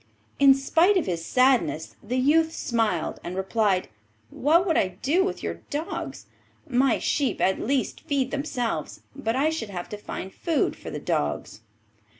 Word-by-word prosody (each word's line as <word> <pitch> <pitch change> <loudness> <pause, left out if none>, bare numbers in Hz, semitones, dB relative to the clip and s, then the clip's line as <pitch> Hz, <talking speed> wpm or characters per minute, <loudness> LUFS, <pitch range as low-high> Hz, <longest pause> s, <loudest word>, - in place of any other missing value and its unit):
In 275 -1 +8
spite 330 +8 +3
of 360 - +1
his 170 -3 -2
sadness, 250 - +2
the 240 +5 -3
youth 315 +5 +3
smiled 225 -8 -1
and 175 - -5
replied, 190 0 +1 0.4
'What 330 +6 +3
would 330 -4 +1
I 185 -1 +1
do 330 +8 +3
with 380 - -3
your - - -4
dogs? 300 +3 -4 0.4
My 260 -2 +3
sheep 280 -3 0
at 190 - +2
least 265 +1 -1
feed 270 -3 -1
themselves, 250 - -3
but 240 -4 -2
I 295 +4 +2
should 320 -10 -4
have 180 -3 -6
to 210 - -5
find 190 -2 -6
food 325 -4 0
for - - -9
the - - -5
dogs. 75 +8 -2
255 Hz, 160 wpm, -25 LUFS, 190-295 Hz, 0.4 s, In